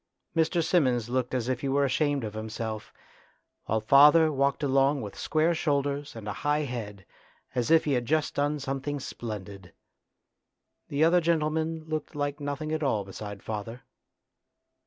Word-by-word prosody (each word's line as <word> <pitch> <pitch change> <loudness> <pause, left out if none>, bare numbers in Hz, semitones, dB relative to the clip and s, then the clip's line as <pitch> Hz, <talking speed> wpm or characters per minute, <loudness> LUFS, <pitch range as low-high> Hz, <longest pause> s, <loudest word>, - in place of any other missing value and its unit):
Mr. 165 +1 +2
Simmons 125 -9 +2
looked 125 0 -1
as 125 -2 -1
if 130 0 -1
he 140 - -2
were 140 +1 +2
ashamed 145 0 +1
of 105 -2 -4
himself, 110 0 -5 0.7
while 110 - 0
father 150 +7 +6
walked 140 +1 0
along 135 +1 +3
with 105 -5 -7
square 160 +2 +1
shoulders 145 -3 -1
and 110 -2 -8
a 105 - -2
high 145 +5 0
head 105 -8 -6 0.5
as 125 0 -1
if 165 0 +5
he 145 - +1
had 120 -2 0
just 155 0 +1
done 145 +1 0
something 135 +1 -3
splendid. 100 -8 -7 1.1
The 145 +2 +1
other 175 +2 +5
gentleman 160 0 0
looked 155 -1 -4
like 145 0 -2
nothing 145 +2 -4
at 155 0 -1
all 110 -9 0
beside 100 0 -8
father. 110 +3 -5
140 Hz, 155 wpm, -28 LUFS, 115-150 Hz, 1.1 s, father